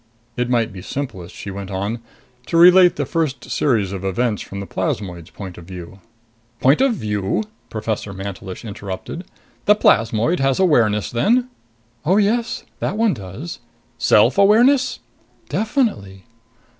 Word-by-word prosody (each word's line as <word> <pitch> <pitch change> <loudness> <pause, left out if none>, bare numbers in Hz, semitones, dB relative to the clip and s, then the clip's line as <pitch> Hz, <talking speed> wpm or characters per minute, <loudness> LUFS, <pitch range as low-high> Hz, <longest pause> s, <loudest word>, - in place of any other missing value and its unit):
It 125 0 -1
might 115 -3 +1
be 95 - -8
simplest, 95 -9 -6
she 100 - -7
went 100 0 -6
on, 100 +4 -3 0.5
to 165 - 0
relate 180 +1 +7
the 145 - -1
first 150 -4 -2
series 110 -9 +1
of 95 -1 -5
events 105 +3 0
from 100 - -7
the 100 - -5
plasmoid's 90 -5 -3
point 95 -4 -9
of 85 - -12
view. 90 +1 -9 0.6
"Point 135 - +4
of 265 -4 +3
view?" 105 - -1 0.3
Professor 110 -2 -3
Mantelish 95 +1 -7
interrupted. 100 - -6 0.4
"The 210 - +6
plasmoid 115 - +2
has 135 +2 +1
awareness 115 - +3
then?" 240 - +2 0.5
"Oh, 180 +6 +3
yes. 230 +3 +1 0.2
That 205 - -2
one 225 -1 +3
does." 110 - -7 0.4
"Self 120 - +4
awareness?" 245 +6 +4 0.5
"Definitely." 210 - -1
115 Hz, 140 wpm, -20 LUFS, -, 0.6 s, relate